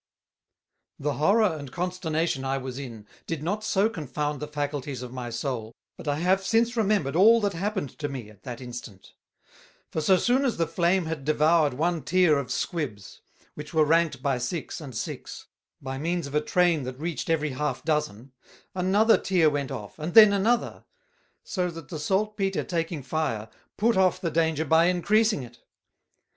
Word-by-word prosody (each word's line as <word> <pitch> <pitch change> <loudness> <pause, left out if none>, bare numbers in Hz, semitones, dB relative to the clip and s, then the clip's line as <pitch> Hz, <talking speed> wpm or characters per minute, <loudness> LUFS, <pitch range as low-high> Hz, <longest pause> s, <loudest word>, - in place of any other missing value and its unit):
The 145 +1 -1
Horror 200 +4 +3
and 140 -3 -9
Consternation 170 -5 -2
I 135 0 -1
was 130 0 -6
in 115 -6 -8 0.2
did 165 -3 -3
not 205 +6 -2
so 205 -1 +2
confound 150 - -3
the 150 - -5
faculties 145 -3 -4
of 125 0 -8
my 125 -2 -5
Soul, 115 -2 -4 0.2
but - - -11
I 145 - +1
have 185 +5 +1
since 230 +4 +2
remembered 205 - +1
all 220 +6 +7
that 205 -1 0
happened 190 - -3
to 145 - -2
me 130 -6 -6
at 105 - -20
that 125 -2 -7
instant. 120 -6 -9 0.8
For 160 - -1
so 185 +5 +4
soon 250 +7 +2
as 255 -5 0
the 165 - +2
Flame 170 +2 +1
had 160 -3 -4
devoured 155 -1 +3
one 165 +3 0
tier 165 -1 +3
of 140 - -5
Squibs, 130 - -4 0.3
which 150 +2 -9
were 155 -1 +5
ranked 160 -4 +2
by 135 -3 +1
six 145 +7 -4
and 135 -6 -9
six, - - -6 0.3
by 135 0 -5
means 170 +2 -1
of 140 - -8
a 150 - +2
Train 175 0 +2
that 130 0 -6
reached 165 0 -4
every 155 -2 +1
half 135 0 -3
dozen, 135 -6 -2 0.4
another 195 +5 +3
tier 175 -5 +3
went 140 -2 -2
off, 105 +7 -7
and 160 +3 -4
then 215 -2 +9
another; 230 +5 0 0.6
so 180 -3 -2
that 165 -4 -10
the 160 - -5
Salt 205 +7 0
Peter 195 -2 -1
taking 165 -4 -3
Fire, 125 -6 -2 0.3
put 230 +2 +2
off 185 -2 +3
the 170 - -2
danger 160 -1 +1
by 160 +3 +4
encreasing 210 - +2
it. 120 -1 -13
160 Hz, 180 wpm, -26 LUFS, 135-185 Hz, 0.8 s, then